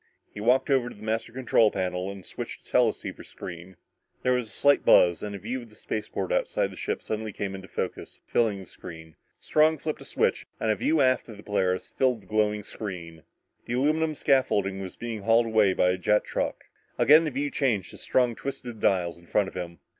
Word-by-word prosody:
He - - -8
walked 130 +5 +3
over 130 -3 +3
to - - -11
the 105 - -14
master 110 +1 -2
control 120 -3 +3
panel 90 -1 -2
and 100 -2 -8
switched - - -7
the - - -18
teleceiver - - +1
screen. 85 +1 -9 0.5
There 125 - +3
was 125 -2 0
a - - -9
slight 145 0 +3
buzz, 85 -2 +5
and 105 -1 -4
a - - -4
view 120 +7 -4
of 120 - -13
the 105 - -18
spaceport 110 - -3
outside - - 0
the - - -10
ship 435 +2 -3
suddenly 110 0 -3
came 100 0 -4
into 95 0 -8
focus, - - -5
filling 110 -4 +1
the 95 - -9
screen. 80 -1 -11 0.2
Strong 155 +1 +3
flipped 155 +1 -4
a - - -10
switch - - 0
and 110 - +1
a - - +2
view 150 +9 +2
aft 130 -2 +2
on 110 - -9
the 105 - -12
Polaris 95 -3 0
filled 125 -5 +1
the - - -19
glowing 105 -1 +1
square. 90 -6 -7 0.5
The 120 - -4
aluminum 155 +4 +1
scaffolding 100 -9 +1
was 95 -1 -7
being 115 -2 -4
hauled 115 +3 +4
away 110 -4 +3
by 90 0 +3
a 90 - -2
jet 105 +3 +3
truck. - - -3 0.3
Again 155 +3 +7
the 155 - 0
view 140 +1 -2
changed 110 -10 0
as - - -10
Strong 125 -3 +1
twisted 125 -4 -6
the - - +3
dials 85 -3 0
in 85 - -20
front 100 +1 +1
of - - -17
him. 85 -2 -6
110 Hz, 220 wpm, -27 LUFS, 95-130 Hz, 0.5 s, Again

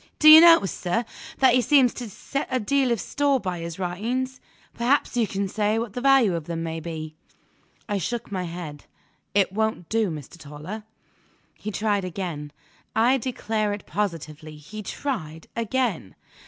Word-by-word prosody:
"Do 310 - +7
you 315 +1 +12
notice, 330 - +7
sir, 210 +7 -1 0.3
that 260 -2 +5
he 255 - +4
seems 255 0 +4
to 240 -3 -6
set 275 +7 -4
a 255 -1 0
deal 260 +3 +1
of 235 - +1
store 285 +3 +1
by 180 -5 -4
his 165 0 -6
writings? 235 +9 -3 0.3
Perhaps 250 +3 +1
you 235 -3 +2
can 200 0 -2
say 210 +2 0
what 225 -3 -3
the 245 - -4
value 270 -7 +5
of 165 -3 -3
them 165 0 -4
may 165 0 -3
be?" 155 -1 -6 0.7
I 205 -2 -1
shook 235 +5 -4
my 185 -2 -2
head. 165 -4 -7 0.5
"It 195 -2 +3
won't 220 -5 -1
do, 220 -3 +1
Mr. 155 +1 -8
Toller!" 160 +9 -8 0.7
He 215 - -7
tried 205 -1 0
again 170 -5 -5 0.4
I 245 +4 +4
declare 220 -4 -1
it 205 - -7
positively, 155 -6 -4
he 185 +9 -9
tried 180 - -4
again. 230 - -1
210 Hz, 165 wpm, -25 LUFS, 170-245 Hz, 0.7 s, you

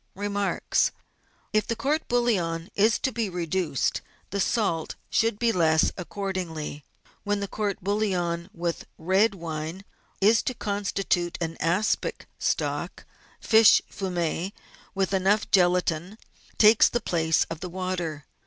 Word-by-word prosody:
Remarks. 205 0 0 0.3
— - - -38
If 215 0 +2
the 230 - -1
court 295 +6 -1
bouillon 185 -9 0
is 220 +3 +3
to 265 - -1
be 230 -4 -2
reduced, 175 -5 -1 0.3
the 200 - -2
salt 180 -10 0 0.2
should 225 -2 +2
be 235 +1 +2
less 160 -4 +3
accordingly. 180 -6 -4 0.4
When 205 0 0
the 200 - -3
court 205 -2 -3
bouillon 180 -4 -1
with 170 -1 -4
red 195 +5 +2
wine 165 +2 -5 0.3
is 215 +4 +5
to 255 - -3
constitute 195 -4 -1
an 165 -1 -3
aspic 175 +7 0
stock, - - -2 0.3
fish 220 -1 +6
fumet 180 -1 -2 0.4
with 195 0 0
enough 195 +3 +2
gelatine 180 +1 +2 0.4
takes 215 +1 +7
the 240 - 0
place 160 -6 +1
of 165 - -4
the 180 - -5
water. 175 -5 -3
190 Hz, 130 wpm, -26 LUFS, 170-205 Hz, 0.4 s, takes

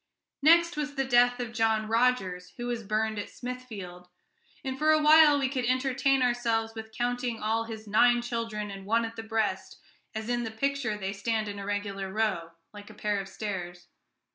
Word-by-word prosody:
Next 335 +2 +5
was 295 -1 -3
the 270 -1 0
death 245 -1 +4
of 240 -2 -4
John 220 -2 +1
Rogers, 205 -7 +1
who 240 - -4
was 240 -1 -2
burned 215 0 -1
at 205 - -5
Smithfield; 215 -8 -8 0.6
and 265 -1 -3
for 305 +3 +1
a 310 0 +6
while 305 -1 +7
we 275 -2 +1
could 260 -1 -2
entertain 260 +1 +2
ourselves 230 -2 0
with 220 -1 -8
counting 245 0 -2
all 225 +1 0
his 220 -1 -8
"nine 240 +3 +4
children 230 -3 -3
and 195 0 -9
one 230 +2 +2
at 225 0 -7
the 225 - -5
breast," 220 -1 -2 0.4
as 220 0 -4
in 240 0 0
the 225 - -3
picture 255 -1 -1
they 195 -1 -3
stand 215 +2 -1
in 205 0 -5
a 200 - -6
regular 200 -2 -3
row, 195 -6 -1 0.2
like 205 0 -11
a - - -13
pair 210 -1 -1
of 195 0 -6
stairs. 175 -5 -6
225 Hz, 190 wpm, -28 LUFS, 210-250 Hz, 0.6 s, while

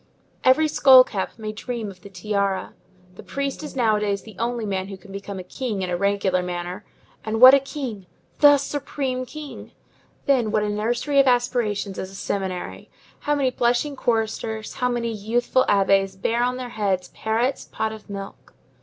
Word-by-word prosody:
Every 260 +5 +5
skull 265 -3 +7
cap 195 -6 -4
may 215 -1 -5
dream 225 -1 -5
of 185 -2 -17
the 200 - -11
tiara. 195 0 -2 0.4
The - - -11
priest 280 +1 -4
is 300 - -8
nowadays 210 -5 +1
the 220 -3 -13
only 235 -1 -1
man 190 -2 -2
who 195 -1 -8
can 195 +1 -15
become 200 0 -6
a 185 - -6
king 210 0 -4
in 180 - -3
a - - +1
regular 195 -1 +1
manner; 180 +2 -5 0.4
and 220 +1 -2
what 255 +2 +11
a 275 - +7
king! 260 - -6 0.3
the 290 -1 +8
supreme 270 -2 -3
king. 305 0 -9 0.5
Then 255 -6 +2
what 210 0 +1
a 210 - -1
nursery 240 +7 0
of 275 - +5
aspirations 240 -5 0
is 190 - -5
a 195 - -12
seminary! 190 -2 -4 0.3
How 295 - 0
many 270 -3 +1
blushing 245 +4 +1
choristers, 220 -2 -2
how 250 - 0
many 235 -1 -1
youthful 240 +5 +1
abbés 195 -1 +2
bear 230 +4 0
on 250 +1 0
their 250 -1 -5
heads 195 -5 -1
Perrette's 235 +5 -1
pot 220 - -3
of 215 -1 -12
milk! 195 -1 -9
220 Hz, 180 wpm, -23 LUFS, 200-255 Hz, 0.5 s, what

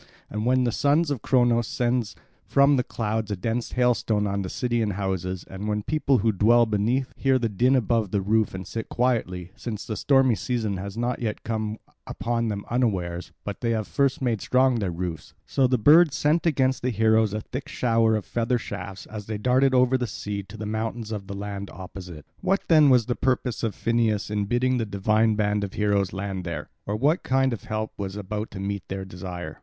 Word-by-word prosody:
And 105 - -3
as 115 - -1
when 130 0 +3
the 120 - +1
son 145 +7 +2
of 130 -6 -2
Cronos 120 -2 +3
sends 120 -3 -1 0.3
from 140 +1 +5
the 125 - +1
clouds 110 -2 -2
a 105 - -1
dense 115 +5 -3
hailstorm 120 -4 +2
on 100 -1 -1
city 120 -2 -1
and 105 -2 0
houses, 95 -1 -3
and 100 +3 -5
the 105 0 -1
people 145 0 +2
who 110 +1 +2
dwell 115 +4 +4
beneath 115 +5 0
hear 135 -1 +2
the 120 -2 0
din 120 +6 +2
above 115 -4 +1
the 100 - 0
roof 105 +1 +1
and 95 0 -6
sit 115 +4 -5
quietly, 95 -8 -1
since 110 -3 -6
the 110 - -4
stormy 135 -1 +4
season 110 -3 -2
has 100 +3 -6
not 120 +1 -1 0.2
come 110 -1 -2 0.3
upon 115 0 -1
them 100 -2 -3
unawares, 95 -8 -1
but 100 -2 -6
they 115 - 0
have 110 -2 -1
first 140 -1 0
made 115 -5 0
strong 130 -1 +3
their 100 -4 -1
roofs; 85 -3 -5
so 135 -2 +2
the 125 0 +2
birds 150 +6 +6
sent 160 +4 +2
against 130 -4 +1
the 125 - 0
heroes 110 -1 +3
a 105 - -2
thick 130 +5 -6
shower 115 -2 +2
of 105 - -3
feather 120 +1 0
shafts 100 -3 -7
as 105 -2 -8
they 110 -1 -3
darted 130 +4 +3
over 130 +1 +4
the 125 - -1
sea 105 -1 -4
to 100 +3 -12
the 110 - -5
mountains 110 +1 -3
of 100 -3 -5
the 100 - -6
land 100 0 -5
opposite. 90 -4 -9
What 190 +1 +1
then 155 -3 +7
was 125 -4 +5
the 120 - 0
purpose 125 -3 0
of 115 -3 -2
Phineus 115 -3 0
in 105 -1 0
bidding 125 +4 +1
the 115 - 0
divine 105 +2 +2
band 105 -1 +1
of 100 - -5
heroes 100 -2 +1
land 95 -1 -4
there? 85 -4 -5 0.2
Or 105 - -1
what 145 +10 +2
kind 135 -1 +1
of 115 - -7
help 110 0 -3
was 100 -1 -4
about 105 +2 -4
to 95 - -8
meet 100 -1 -4
their 95 0 -4
desire? 90 -1 -7
110 Hz, 210 wpm, -25 LUFS, 100-125 Hz, 0.3 s, then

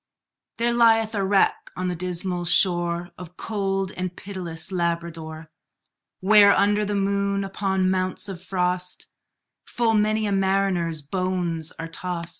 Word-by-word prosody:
There 235 +1 +1
lieth 225 -2 +4
a 200 -2 0
wreck 195 0 +2
on 185 0 -2
the 180 - -2
dismal 180 0 -3
shore 175 -1 +2
Of 180 0 -11
cold 195 -3 -2
and 180 -1 -5
pitiless 180 -3 -4
Labrador; 170 -3 -3 0.7
Where, 200 +1 +6
under 205 +1 +3
the 205 0 -2
moon, 200 0 0
upon 190 -1 0
mounts 185 +2 -1
of 190 -3 -7
frost, 180 -1 -1 0.6
Full 230 -2 +1
many 215 0 +2
a 205 - -1
mariner's 190 -5 0
bones 175 -1 -2
are 165 - -5
tost. 170 0 -5
185 Hz, 135 wpm, -24 LUFS, 175-200 Hz, 0.7 s, Where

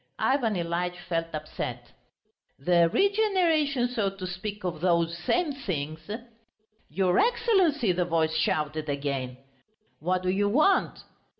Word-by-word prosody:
Ivan 245 -6 +1
Ilyitch 175 +1 -2
felt 165 -1 -1
upset. 155 0 -6 0.7
"The 170 +3 +3
regeneration, 350 - +2
so 225 -5 -1
to 195 -1 -8
speak, 200 +3 -5
of 175 -4 -3
those 170 -2 +2
same 300 - 0
things." 160 - -5 0.8
"Your 180 +3 +2
Excellency!" 380 - +3
the 180 0 0
voice 160 -2 +1
shouted 155 -1 -1
again. 140 -3 -3 0.6
"What 180 +3 -1
do 185 - 0
you 205 +2 +1
want?" 310 - +2
180 Hz, 120 wpm, -27 LUFS, 165-270 Hz, 0.8 s, The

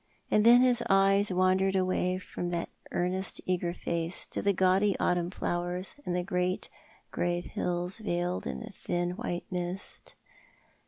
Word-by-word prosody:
And 210 - +4
then 240 +2 +8
his 250 -2 +3
eyes 195 +1 +4
wandered 185 +1 +3
away 185 -1 +1
from 175 -1 -5
that 170 -1 -2 0.2
earnest, 185 +2 0
eager 180 -1 0
face 170 0 -3
to - - -3
the 200 - +3
gaudy 190 +2 +3
autumn 175 -1 +1
flowers 175 +1 -3
and 175 - 0
the 180 - 0
great 180 0 -1 0.4
grave 175 0 -1
hills 180 +3 -2
veiled 175 -3 -2
in - - -5
thin 175 -2 -2
white 180 -3 -4
mist. 180 +1 -5
180 Hz, 145 wpm, -30 LUFS, 175-195 Hz, 0.4 s, then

